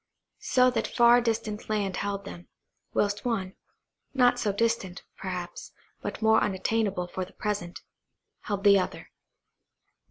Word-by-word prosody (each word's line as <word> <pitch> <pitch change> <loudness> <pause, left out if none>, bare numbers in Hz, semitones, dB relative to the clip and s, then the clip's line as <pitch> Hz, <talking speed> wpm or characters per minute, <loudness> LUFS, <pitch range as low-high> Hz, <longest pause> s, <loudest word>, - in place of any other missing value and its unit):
So 255 0 +3
that 225 -2 -1
far 240 0 +5
distant 225 -2 -2
land 200 -3 -1
held 200 -1 -3
them, 175 -3 -9 0.4
whilst 205 0 0
one–not 245 +4 -1
so 210 - +1
distant, 200 -3 -1
perhaps, 185 -2 -6 0.3
but - - -5
more 220 0 +5
unattainable 200 -1 0
for 185 +1 -4
the 180 - -11
present–held 205 0 -6
the 200 -1 +7
other. 185 - -5
205 Hz, 120 wpm, -27 LUFS, 190-230 Hz, 0.4 s, the